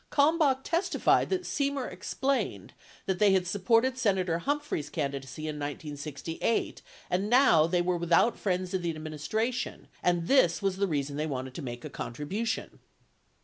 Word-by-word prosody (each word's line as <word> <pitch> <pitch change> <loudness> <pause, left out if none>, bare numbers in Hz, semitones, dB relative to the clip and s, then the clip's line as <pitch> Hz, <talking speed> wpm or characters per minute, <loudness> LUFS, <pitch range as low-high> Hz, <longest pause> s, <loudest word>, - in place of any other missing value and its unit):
Kalmbach 285 -2 +3
testified 340 +3 +2
that 370 -1 0
Semer 280 -4 -1
explained 275 0 -2 0.3
that 190 -2 -1
they 205 -2 +5
had 185 -1 +2
supported 230 +7 +2
Senator 185 -7 +1
Humphrey's 285 - -2
candidacy 140 +1 -4
in 155 -1 -3
1968 145 - -3 0.3
and 195 +3 0
now 230 - +6
"they 175 0 +1
were 180 0 +1
without 170 +7 +3
friends 185 -1 -2
in 190 - 0
the 170 -2 -2
administration 185 - -3
and 175 -1 +1
this 180 -12 +4
was 195 -2 -1
the 200 0 +1
reason 145 -3 -2
they 155 +1 -1
wanted 130 -3 -4
to 165 - -6
make 120 -3 -6
a - - -5
contribution." 200 - -4
180 Hz, 150 wpm, -29 LUFS, 155-235 Hz, 0.3 s, now